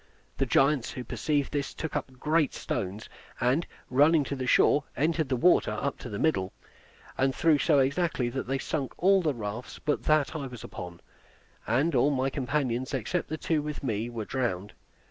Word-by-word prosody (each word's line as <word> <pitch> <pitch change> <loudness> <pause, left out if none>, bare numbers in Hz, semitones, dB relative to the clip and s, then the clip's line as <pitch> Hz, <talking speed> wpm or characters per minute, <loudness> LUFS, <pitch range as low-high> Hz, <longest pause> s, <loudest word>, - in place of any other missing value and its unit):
The 135 - +1
giants, 135 0 +3
who 125 - -6
perceived 145 +1 -1
this, 145 -1 -2
took 160 - -5
up - - -2
great 155 0 +1
stones, 100 +4 -4 0.3
and, 130 +7 +1 0.2
running 145 +4 +4
to 140 - -4
the 130 -1 -4
shore, 145 +3 +4
entered 155 0 +1
the 130 - +2
water 175 +3 +4
up 140 - -2
to 125 - -7
the 100 - -4
middle, 95 -10 0 0.7
and 135 0 +2
threw 160 -3 +3
so 150 -1 +3
exactly 140 -1 +1
that 130 +1 -4
they 135 +1 0
sunk 135 0 -3
all 195 +1 +4
the 155 -5 0
rafts 110 +2 -6
but 150 - -1
that 155 0 +2
I 140 -3 -3
was 125 -3 -9
upon; 90 -1 -8 0.7
and 140 +9 +2
all 135 +2 +4
my 135 -1 0
companions 130 -2 -1
except 150 - -2
the 155 - -3
two 155 -1 0
with 150 -1 -5
me, 115 -2 -1
were 115 -3 -5
drowned. 105 -7 -2
135 Hz, 185 wpm, -28 LUFS, 120-150 Hz, 0.7 s, running